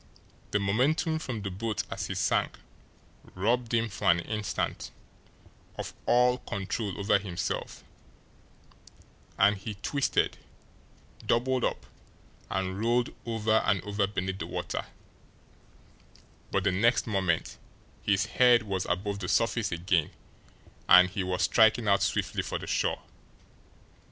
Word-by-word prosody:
The - - +1
momentum 145 - +1
from 120 -9 -5
the 100 - -3
boat 105 +2 -2
as - - -3
he - - -4
sank - - 0 0.8
robbed 115 +5 0
him 115 0 +2
for 100 - -1
an 85 0 +5
instant 105 +1 -3 0.9
of - - -5
all 125 +1 +4
control 100 -1 -4
over 100 0 +3
himself, 90 -4 -4 1.5
and 100 +1 +5
he 105 +2 -6
twisted, 140 +8 0 0.8
doubled 125 +1 +1
up, - - -1 0.6
and 95 0 -2
rolled 120 +2 +1
over 110 -1 +2
and 100 -1 +2
over 100 -1 0
beneath 95 -1 -3
the 85 - -4
water 85 - -4 1.6
but 100 - 0
the 100 - +2
next 115 +7 +2
moment 95 -7 -1 0.4
his 100 +1 +2
head 120 +1 +4
was 95 -3 -3
above 100 +3 -2
the 90 -3 -4
surface 115 -2 +1
again, 85 -2 +1 0.8
and 90 +1 +8
he 100 - -2
was 90 0 -1
striking 110 0 +4
out 100 -1 +4
swiftly - - 0
for - - -3
the - - -7
shore. - - -1
105 Hz, 125 wpm, -28 LUFS, 95-115 Hz, 1.6 s, and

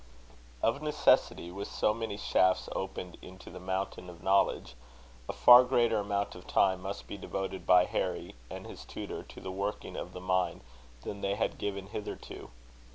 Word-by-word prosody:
Of 115 +5 +2
necessity, 150 - +2
with 100 +2 -5
so 105 - +1
many 110 -2 -4
shafts 95 -2 +2
opened 95 -2 -5
into 95 +1 -12
the 90 - -9
mountain 95 -1 -3
of 85 -1 -12
knowledge, 95 -10 +2 0.6
a - - +2
far 125 +1 +9
greater 120 -3 +2
amount 100 0 -1
of - - -12
time 95 -1 +3
must 100 +2 -5
be 100 - -8
devoted 95 0 -4
by 90 0 +7
Harry - - -2 0.2
and - - -7
his - - -9
tutor - - -6
to - - -12
the 95 - -6
working 100 +2 -4
of - - -6
the - - -7
mine, 90 0 0 0.4
than 100 - -6
they 100 0 0
had 110 - -1
given 100 -1 -3
hitherto. 105 +1 -7
95 Hz, 170 wpm, -31 LUFS, 95-105 Hz, 0.6 s, far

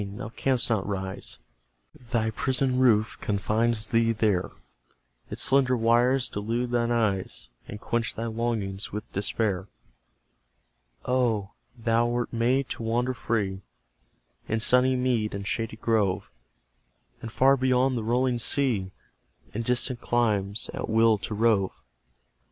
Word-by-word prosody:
Thou 100 +1 -7
canst 125 +1 0
not 110 -5 0
rise: 95 -2 -3 0.7
Thy 110 -3 0
prison 130 +2 0
roof 115 -4 +3
confines 110 +2 0
thee 115 0 +3
there; 105 -5 +1 0.8
Its - - -1
slender 130 -2 +3
wires 120 +3 +3
delude 115 +4 -2
thine 120 -1 +1
eyes, 100 - -1 0.2
And 105 - -7
quench 120 +1 -2
thy 115 - -3
longings 110 -4 -2
with 105 +1 -7
despair. 100 -1 -1 1.4
Oh, 115 -6 0 0.3
thou 115 0 +2
wert 120 0 -2
made 125 +3 +1
to - - -5
wander 120 +3 0
free 100 -6 -2 0.9
In 110 - 0
sunny 125 +3 +4
mead 125 -5 0
and 100 0 -5
shady 115 +1 -2
grove, 105 -5 0 0.9
And 115 - -6
far 135 +3 +4
beyond 130 0 +2
the 115 - -2
rolling 120 +2 +1
sea, 115 -8 0 0.6
In 115 - -2
distant 125 +1 0
climes, 105 -3 0
at - - -4
will 110 -1 +4
to 105 - -4
rove! 105 -3 +1
115 Hz, 130 wpm, -26 LUFS, 105-125 Hz, 1.4 s, sunny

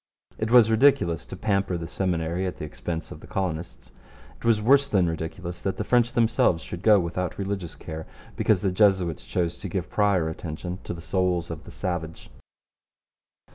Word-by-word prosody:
It 110 - -1
was 115 -2 +7
ridiculous 110 - +3
to - - -7
pamper 100 -4 0
the 85 -1 -5
Seminary 90 0 -1
at 90 - -5
the - - -5
expense 80 +2 -5
of - - -8
the - - -13
colonists. 85 -3 -4 0.5
It - - -19
was 115 -2 +3
worse 140 +6 +4
than 95 -8 +2
ridiculous 85 +2 -5
that 95 - -2
the - - -1
French 120 -1 +2
themselves 110 -7 +2
should 85 - -7
go 105 -1 +6
without 90 0 -3
religious 95 -4 -4
care 80 0 -7 0.3
because 105 -4 +2
the 95 - +2
Jesuits 95 -4 +2
chose 85 -1 -1
to 100 - -5
give 90 -1 -3
prior 100 -6 +2
attention 85 +3 -5
to - - -4
the 85 - -9
souls 90 -2 0
of 80 - -7
the - - -10
savage. 85 -3 -4
90 Hz, 180 wpm, -25 LUFS, 85-105 Hz, 0.5 s, was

